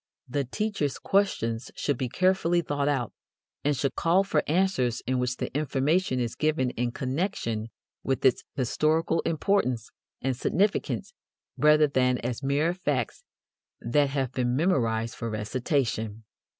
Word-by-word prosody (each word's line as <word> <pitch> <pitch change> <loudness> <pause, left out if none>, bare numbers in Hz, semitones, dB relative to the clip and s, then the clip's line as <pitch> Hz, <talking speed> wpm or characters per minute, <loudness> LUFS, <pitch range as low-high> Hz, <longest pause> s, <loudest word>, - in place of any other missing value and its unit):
The 140 +2 -1
teacher's 200 - -2
questions 125 - 0
should 145 - 0
be 130 -2 -1
carefully 185 +1 +2
thought 145 -2 -1
out, 135 -6 0 0.5
and 145 -1 +1
should 140 +1 0
call 175 +4 +3
for 160 -6 +1
answers 155 -8 +1
in 130 0 0
which 125 0 -1
the - - -4
information 150 +1 +1
is 120 -2 -1
given 155 -5 +1
in 120 0 -2
connection 130 - -2 0.3
with 135 0 -1
its 130 0 +4
historical 155 +6 +1
importance 155 - 0 0.3
and 135 0 -1
significance 200 - 0 0.4
rather 150 0 +5
than 125 -3 +2
as 120 0 -4
mere 145 +5 +1
facts 145 - -2 0.6
that 140 +4 +2
have 135 -3 -1
been 125 -1 0
memorized 115 -8 +1
for 115 - -4
recitation. 110 0 -1
135 Hz, 135 wpm, -27 LUFS, 125-160 Hz, 0.6 s, rather